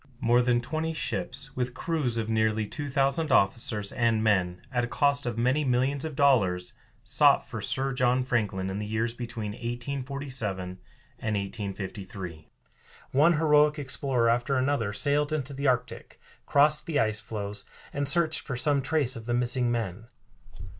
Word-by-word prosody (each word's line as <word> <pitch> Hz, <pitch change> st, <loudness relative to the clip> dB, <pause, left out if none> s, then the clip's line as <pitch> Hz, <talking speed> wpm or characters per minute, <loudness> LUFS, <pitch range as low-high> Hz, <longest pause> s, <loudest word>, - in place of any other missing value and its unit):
More 120 Hz, +1 st, +4 dB
than 120 Hz, -1 st, +2 dB
twenty 160 Hz, +5 st, -3 dB
ships, 135 Hz, -3 st, -3 dB
with 125 Hz, 0 st, -2 dB
crews 140 Hz, -7 st, -1 dB
of 110 Hz, -1 st, -1 dB
nearly 110 Hz, -1 st, +1 dB
two 145 Hz, +6 st, -5 dB
thousand 140 Hz, +3 st, +1 dB
officers 105 Hz, -1 st, +2 dB
and 115 Hz, -2 st, +1 dB
men, 90 Hz, -4 st, +1 dB
at 120 Hz, -1 st, 0 dB
a -, -, -1 dB
cost 140 Hz, +4 st, +1 dB
of 120 Hz, -2 st, -3 dB
many 130 Hz, +6 st, +2 dB
millions 135 Hz, +2 st, 0 dB
of 155 Hz, -3 st, -5 dB
dollars, 95 Hz, -11 st, +2 dB, 0.3 s
sought -, -, +3 dB
for -, -, -6 dB
Sir 135 Hz, 0 st, -1 dB
John 125 Hz, 0 st, +2 dB
Franklin 100 Hz, -7 st, -1 dB
in 100 Hz, -, -4 dB
the 105 Hz, -, -4 dB
years 110 Hz, +2 st, -1 dB
between 115 Hz, -3 st, -5 dB
1847 120 Hz, -5 st, -5 dB, 0.4 s
and 110 Hz, -1 st, -2 dB
1853. 95 Hz, -4 st, -6 dB, 0.6 s
One 150 Hz, +6 st, +5 dB
heroic 150 Hz, -1 st, +4 dB
explorer 130 Hz, -3 st, 0 dB
after 120 Hz, +4 st, +1 dB
another 130 Hz, -5 st, 0 dB
sailed 145 Hz, +8 st, +1 dB
into 145 Hz, -3 st, -2 dB
the 140 Hz, +1 st, -2 dB
Arctic, 125 Hz, -2 st, -2 dB, 0.3 s
crossed 150 Hz, +1 st, +4 dB
the 155 Hz, -3 st, +1 dB
ice 110 Hz, -3 st, +1 dB
floes, 105 Hz, -2 st, -4 dB, 0.3 s
and 140 Hz, -1 st, 0 dB
searched 165 Hz, 0 st, +2 dB
for 130 Hz, -, -5 dB
some 140 Hz, +3 st, +2 dB
trace 140 Hz, -2 st, 0 dB
of 115 Hz, -1 st, -9 dB
the 120 Hz, -, +1 dB
missing 125 Hz, 0 st, +3 dB
men. 115 Hz, -2 st, -3 dB
125 Hz, 160 wpm, -27 LUFS, 110-140 Hz, 0.6 s, One